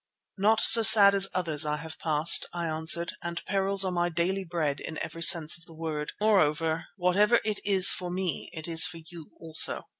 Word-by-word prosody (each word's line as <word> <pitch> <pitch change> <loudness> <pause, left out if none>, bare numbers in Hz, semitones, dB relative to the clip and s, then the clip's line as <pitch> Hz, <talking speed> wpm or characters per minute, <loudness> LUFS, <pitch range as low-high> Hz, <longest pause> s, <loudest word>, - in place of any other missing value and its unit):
"Not 215 +2 0
so 230 - +6
sad 205 -2 +7
as 195 -1 0
others 165 -5 -2
I 150 0 -4
have 160 +1 -13
passed," 155 0 +2
I 170 -1 -7
answered, 160 +2 -1
"and 170 0 -9
perils 195 0 -1
are 185 - -4
my 175 -1 -4
daily 175 +4 -5
bread 160 -5 -6
in 160 - -10
every 165 +1 -9
sense 165 -1 +4
of 165 - -19
the 165 - -18
word. 155 -2 -8
Moreover, 165 -5 -2
whatever 200 +6 0
it 215 -2 -4
is 195 -2 +5
for 180 -1 -6
me 180 0 -6
it 160 -1 -11
is 165 -1 +5
for 175 -1 -1
you 165 -1 -16
also." 160 -1 +1
170 Hz, 200 wpm, -24 LUFS, 160-190 Hz, -, sad